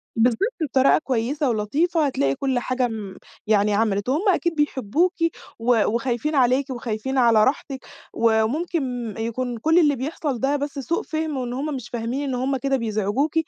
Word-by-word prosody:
بالضبط، 230 0 +2 0.2
بطريقة 270 -2 +4
كويسة 265 +1 -1
ولطيفة 295 +10 +1
هتلاقي 140 - 0
كل 265 -2 0
حاجة 255 +1 -1
آمم، 215 -5 -6 0.3
يعني 210 -1 +3
عملت 205 0 0
وهُم 290 +6 +1
أكيد 340 -2 +1
بيحبوكِ 295 - +1 0.5
و 240 +2 +3
وخايفين 245 +6 -1
عليكِ 260 +2 +3
وخايفين 245 +1 -3
على 230 -4 +5
راحتِك، 265 +1 -2 0.3
وممكن 245 +1 0
يكون 235 +2 -3
كل 320 +9 +3
اللي 295 -4 +4
بيحصل 275 0 -3
ده 275 +3 +1
بس 285 0 -3
سوء 330 +6 -2
فهم، 315 -3 -3
وإن 245 -1 -3
هُم 285 +3 -3
مش 250 -3 -7
فاهمين 240 +4 -3
إن 255 - -1
هُم 265 +2 0
كده 270 +1 0
بيزعجوكِ 220 +5 -1
255 Hz, 160 wpm, -23 LUFS, 230-285 Hz, 0.5 s, على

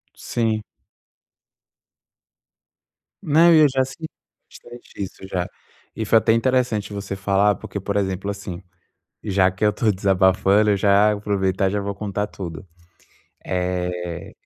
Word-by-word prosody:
Sim. 110 -2 -2 2.6
Né, 165 0 +5
e - - +6
eu 150 - +7
já 130 0 +1
senti 145 +5 -7 0.4
bastante 120 0 -14
isso 95 0 -9
já 90 -1 -2 0.5
e 110 - -3
foi 115 +2 +5
até 110 - +2
interessante 115 -3 0
você 100 -1 -5
falar, 100 +1 +2
porque, 100 - -7
por 100 +1 -4
exemplo, 95 0 -2
assim, 100 -3 -6 0.6
já 95 -3 +2
que 95 +3 -2
eu 105 - +3
tô 110 0 +1
desabafando, 95 +2 +3
eu 100 - +3
já 100 +2 +4
aproveitar 95 -2 0
e 95 - -5
já 100 - -1
vou 100 0 -3
contar 105 0 -3
tudo. 90 -4 -8 0.8
Eh, 90 -2 -3
100 Hz, 135 wpm, -22 LUFS, 95-110 Hz, 2.6 s, eu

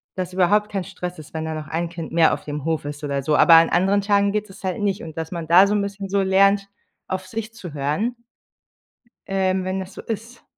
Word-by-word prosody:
das 185 -1 -4
überhaupt 205 +3 +3
kein 195 -3 -2
Stress 180 0 -6
ist, 155 - -13
wenn 160 0 -3
da 160 - -3
noch 155 -1 -6
ein 165 +2 -2
Kind 165 -2 -7
mehr 165 -1 +4
auf - - -5
dem 145 -1 -5
Hof 160 -2 -1
ist 145 +1 -6
oder 140 -1 -2
so. 150 +2 +1
Aber 170 - +7
an 165 0 +6
anderen 195 +3 +2
Tagen 200 0 +2
geht 210 0 -2
das 190 +1 -14
halt 190 +3 -2
nicht 200 -2 -1
und 160 -1 -9
dass 160 0 -4
man 170 -3 -5
da 180 +4 +7
so 205 - 0
'n 205 - +2
bisschen 200 -1 -5
so 200 +1 +1
lernt, 195 +1 +3 0.4
auf 185 0 -3
sich 225 +3 -5
zu 185 -9 -9
hören 150 - -1 1.1
ähm, 190 -1 0
wenn 185 +1 -2
das 190 +1 -8
so - - -8
ist. 230 +2 -6
185 Hz, 245 wpm, -22 LUFS, 160-200 Hz, 1.1 s, Aber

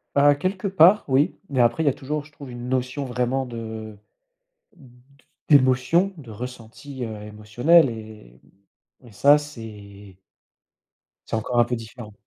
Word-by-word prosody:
Bah, 145 +1 +5
quelque 185 +7 -3
part 190 +2 +5
oui, 140 +6 +2
mais 130 -3 -1
après, 120 +6 +3
il 155 - -1
y - - +6
a 135 - +1
toujours, 150 +2 -4
je 150 - -19
trouve, 140 -3 -11
une 120 0 -7
notion 130 +2 -2
vraiment 125 +2 -1
de 110 -2 -7 0.8
d 135 -8 -18 0.6
d'émotion, 140 +7 +4
de 135 -7 -12
ressenti, 125 +3 -8
heu, 110 -2 -7
émotionnel 115 +10 +3
et 110 - -11 0.6
hem 125 - -16
et - - -17
ça 145 +7 +5
c'est 105 -8 -11 1.1
c'est - - -2
encore 120 +3 -2
un - - +5
peu 120 +1 -3
différent. 115 -1 -10
125 Hz, 155 wpm, -23 LUFS, 110-145 Hz, 1.1 s, y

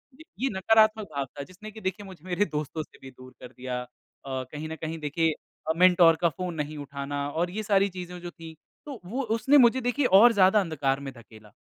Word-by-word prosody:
ये 315 - -14 0.2
ये 270 - 0
नकारात्मक 215 +2 +4
भाव 140 -1 -1
था 140 +2 -9
जिसने 185 +7 -12
की 220 +1 -12
देखिए 190 +1 -4
मुझे 185 -4 -13
मेरे 185 +3 0
दोस्तों 155 -1 -4
से - - -21
भी 135 - -11
दूर 130 0 -15
कर 125 -1 -11
दिया। 125 -1 -5
अ, 125 - -9 0.6
कहीं 150 +1 -6
न 160 - -5
कहीं 160 +1 -4
देखिए 160 +2 0 0.4
अ, - - +3
मेंटर 175 -1 +6
का 170 - +4
फ़ोन 180 +3 -5
नहीं 150 0 -4
उठाना 140 0 -5
और 170 +4 -1
ये 215 +3 -4
सारी 200 -1 +2
चीज़ें 180 -1 -8
जो 175 0 -7
थी 165 -2 -11 0.3
तो 280 -5 -8
वो 235 +9 -3
उसने 265 +6 +4
मुझे 255 0 +5
देखिए 250 +3 0
और 230 +2 +7
ज़्यादा 195 0 +5
अंधकार 140 -7 -1
में 135 -1 -7
धकेला। 110 -3 -16
175 Hz, 220 wpm, -26 LUFS, 145-205 Hz, 0.6 s, और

